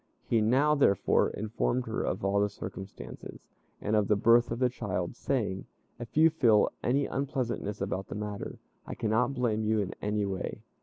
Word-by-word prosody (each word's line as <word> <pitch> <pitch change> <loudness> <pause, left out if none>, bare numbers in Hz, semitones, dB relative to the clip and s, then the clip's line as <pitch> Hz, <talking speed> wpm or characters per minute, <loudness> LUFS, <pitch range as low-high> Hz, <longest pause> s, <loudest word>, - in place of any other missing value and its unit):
He 115 -2 +2
now, 135 +8 +3
therefore, 135 -10 +3
informed 115 +4 -1
her 110 - -2
of - - -2
all 100 +1 +2
the 105 - +2
circumstances, 95 -1 -9 0.3
and 105 - 0
of 105 -2 +2
the 105 - +4
birth 115 +3 +4
of 115 - -2
the 125 +1 +3
child, 105 -5 -3
saying, 105 -9 -2 0.3
"If 120 +4 -8
you 160 +1 +6
feel 115 -9 +4
any 135 +3 +1
unpleasantness 130 -7 -3
about 95 -1 -2
the - - -6
matter, 105 -1 -5 0.3
I - - -5
cannot 115 +5 +1
blame 115 -4 0
you 110 +1 +1
in 100 -3 -1
any 105 0 0
way. 95 -1 -4
110 Hz, 175 wpm, -29 LUFS, 100-125 Hz, 0.3 s, you